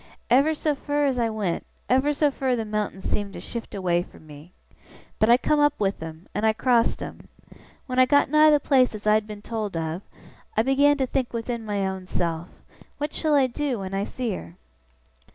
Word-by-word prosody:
Ever 280 +5 +4
so 305 0 0
fur 290 +1 -1
as 265 -3 0
I 230 -1 +1
went, 210 -6 -2 0.2
ever 265 +3 +3
so 295 0 +2
fur 265 -2 0
the 225 -2 -3
mountains 210 -3 -3
seemed 205 -1 -2
to - - -7
shift 235 -3 -7
away 175 -3 +1
from 165 - -13
me. 150 +3 -13 0.7
But 215 - +3
I 240 - +7
come 300 +3 +1
up 290 0 +3
with 200 -3 -1
'em, 160 +2 -8
and 210 - -2
I 220 0 +4
crossed 235 0 +2
'em. - - -9 0.6
When 255 -2 -1
I 255 - +6
got 285 +1 +4
nigh 305 +2 +6
the 295 -1 +5
place 260 -5 +3
as 210 - -9
I 210 - +5
had 215 0 +1
been 210 -1 -9
told 215 -6 -3
of, 165 +2 -3 0.6
I 220 - +4
began 285 +3 +4
to 265 - +1
think 255 -1 -2
within 235 0 -3
my 205 -2 -1
own 190 -1 -4
self, 170 -1 -2 0.5
"What 295 +1 -3
shall 310 -2 +1
I 275 -2 +5
do 260 0 -2
when 190 -1 -6
I 195 +1 0
see 240 +2 -3
her?" 85 - -8
230 Hz, 215 wpm, -25 LUFS, 195-275 Hz, 0.7 s, I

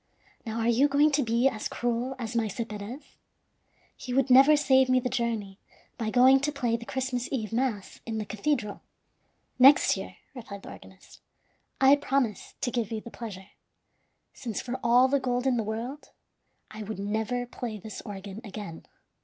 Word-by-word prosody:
Now, 225 +1 -3
are 225 - 0
you 240 +5 +4
going 290 +2 +4
to 290 0 +2
be 235 +1 +2
as 220 -5 -2
cruel 240 +2 -2
as 235 -1 -5
Maese 220 -4 -1
Perez? 215 +7 -7 0.9
He 250 -1 -5
would 270 -1 +2
never 275 +4 +8
save 265 -2 +4
me 255 0 +4
the 250 - -2
journey, 225 -5 -2 0.4
by 220 -2 -1
going 255 +3 +6
to 290 +2 -1
play 245 -5 0
the 235 0 -7
Christmas 255 -2 -2
Eve 225 -5 -3
mass 230 -5 -2
in 225 -1 -4
the 215 - -3
cathedral." 215 0 -2 0.8
"Next 270 +3 +7
year," - - -7 0.2
replied 215 -6 -9
the - - -9
organist, 190 0 -15 0.6
"I 270 +2 +6
promise 270 -7 -1
to 245 - -1
give 235 -4 -2
you 220 - -2
the 235 - -11
pleasure; 205 -5 -8 0.8
since, 230 -5 -5
for 255 0 -4
all 245 +2 +5
the 280 +1 +2
gold 250 -1 -1
in 260 -2 +3
the 230 - 0
world, 230 +7 -5 0.6
I 215 - -8
would 215 0 -5
never 220 +5 -2
play 235 -2 -6
this 210 +1 -8
organ 200 +1 -8
again." 205 -6 -8
235 Hz, 175 wpm, -28 LUFS, 215-260 Hz, 0.9 s, never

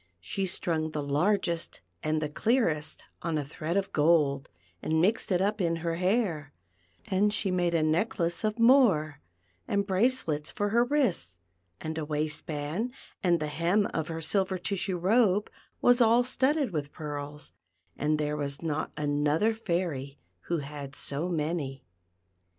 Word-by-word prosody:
She 100 - -3
strung 160 -3 -1
the 150 -1 -3
largest 170 +3 0 0.2
and 155 0 0
the - - 0
clearest 160 - 0 0.2
on 165 -2 -1
a 145 - -2
thread 160 +5 -3
of 200 0 -1
gold, 145 -3 +3 0.3
and 160 0 +1
mixed 205 +5 +2
it 180 0 +3
up 210 +1 0
in 165 -2 +1
her 165 0 -2
hair, 180 - 0 0.5
and 200 +2 +2
she 205 -2 -1
made 175 -2 +1
a 160 - +2
necklace 170 +2 0
of 215 +1 0
more, 220 - +4 0.5
and 200 0 +1
brace 220 +6 +2
lets 150 -1 -2
for 205 -1 -1
her 235 +3 +4
wrists, 240 - 0 0.4
and 160 0 -4
a - - -2
waist 150 0 -2
band, 160 +11 -3 0.3
and 175 -2 +3
the 155 - -2
hem 170 +7 +1
of 160 -1 -1
her 165 -1 -4
silver 190 +3 0
tissue 185 0 -2
robe 205 +2 +3 0.3
was 245 0 +5
all 235 +1 +5
studded 265 +1 +1
with 145 -2 -3
pearls; 150 -1 -6 0.4
and 150 +1 +1
there 150 0 -1
was 140 0 -3
not 155 -1 -2
another 150 +8 +1
fairy 170 -10 -2 0.3
who 170 - 0
had 145 -1 -8
so 145 +6 -2
many. 150 -5 -2
170 Hz, 155 wpm, -29 LUFS, 150-200 Hz, 0.5 s, was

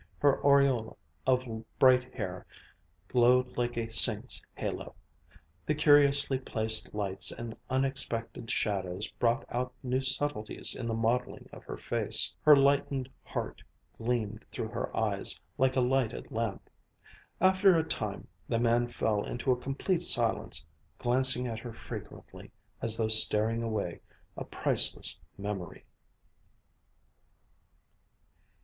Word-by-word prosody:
Her 140 -2 +2
aureole 140 -5 +2 0.3
of 130 -1 +2 0.3
bright 130 -1 +3
hair 95 -6 -6 0.6
glowed 125 +2 +2
like 120 -1 -2
a 115 -1 -3
saint's 110 - +3
halo. - - -5 0.7
The 155 - +1
curiously 145 -2 +3
placed 110 -4 +1
lights 100 -2 0
and 115 -1 -7
unexpected 130 -4 -1
shadows 95 -1 -2
brought 120 +3 -1
out 125 +1 -3
new 130 +1 -1
subtleties 130 -4 0
in 115 - -5
the 115 - -2
modeling 115 +2 -2
of - - -11
her - - -7
face. - - +1
Her 150 -1 +7
lightened 140 -1 +1
heart - - -6 0.4
gleamed 115 -2 -2
through - - -5
her - - -5
eyes, - - -1 0.2
like 130 0 +2
a 130 - +2
lighted 125 -2 -1
lamp. 115 -3 -4 0.7
After 190 0 +4
a 160 - +1
time, 160 - -4 0.2
the - - +1
man 120 +1 +2
fell 110 -3 -1
into 125 +2 -2
a - - +3
complete 140 +7 -2
silence, 115 - +3 0.3
glancing 125 +1 +3
at 115 -2 -4
her 120 0 -9
frequently - - -10 0.3
as 115 -1 +3
though 110 - 0
storing 110 +1 +4
away 110 -6 -4 0.3
a - - -6
priceless - - +1 0.2
memory.... 100 -3 -6
120 Hz, 125 wpm, -29 LUFS, 110-135 Hz, 0.7 s, Her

